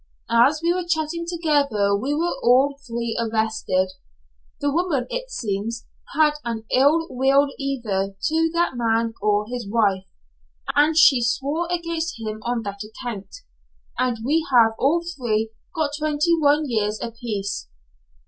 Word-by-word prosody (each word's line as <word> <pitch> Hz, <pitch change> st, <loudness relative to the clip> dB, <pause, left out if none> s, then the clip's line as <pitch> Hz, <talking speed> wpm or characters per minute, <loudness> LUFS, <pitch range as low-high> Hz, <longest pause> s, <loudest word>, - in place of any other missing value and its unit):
As 260 Hz, +7 st, +4 dB
we 340 Hz, +1 st, +3 dB
were 365 Hz, 0 st, -2 dB
chatting 335 Hz, 0 st, -2 dB
together 280 Hz, -, +1 dB
we 265 Hz, +8 st, -1 dB
were 340 Hz, +3 st, 0 dB
all 265 Hz, +4 st, +4 dB
three 235 Hz, -1 st, -3 dB
arrested. 220 Hz, -4 st, 0 dB, 0.7 s
The 285 Hz, 0 st, 0 dB
woman, 315 Hz, -5 st, 0 dB
it -, -, -4 dB
seems, 225 Hz, -, -3 dB, 0.3 s
had 305 Hz, 0 st, +5 dB
an 230 Hz, -2 st, -4 dB
ill 290 Hz, +5 st, +4 dB
will 270 Hz, +2 st, +3 dB
either 215 Hz, -8 st, -2 dB
to 325 Hz, +4 st, +1 dB
that 345 Hz, +1 st, +2 dB
man 230 Hz, -1 st, +1 dB
or 210 Hz, 0 st, +2 dB
his 240 Hz, -3 st, -5 dB
wife, 200 Hz, -4 st, +1 dB, 0.7 s
and 305 Hz, +2 st, +4 dB
she 275 Hz, -6 st, +7 dB
swore 285 Hz, +8 st, -1 dB
against 335 Hz, -4 st, -2 dB
him 215 Hz, -1 st, -5 dB
on 235 Hz, 0 st, -2 dB
that 200 Hz, -1 st, -6 dB
account. 215 Hz, -2 st, -7 dB, 0.7 s
And 250 Hz, -2 st, +1 dB
we 315 Hz, +4 st, +2 dB
have 230 Hz, -3 st, +6 dB
all 330 Hz, +6 st, +2 dB
three 220 Hz, -4 st, -1 dB, 0.2 s
got 310 Hz, -3 st, 0 dB
twenty 310 Hz, +2 st, +2 dB
one 295 Hz, 0 st, +3 dB
years 215 Hz, -3 st, -1 dB
a 230 Hz, -, -4 dB
piece." 210 Hz, -, -4 dB
250 Hz, 145 wpm, -23 LUFS, 220-310 Hz, 0.7 s, she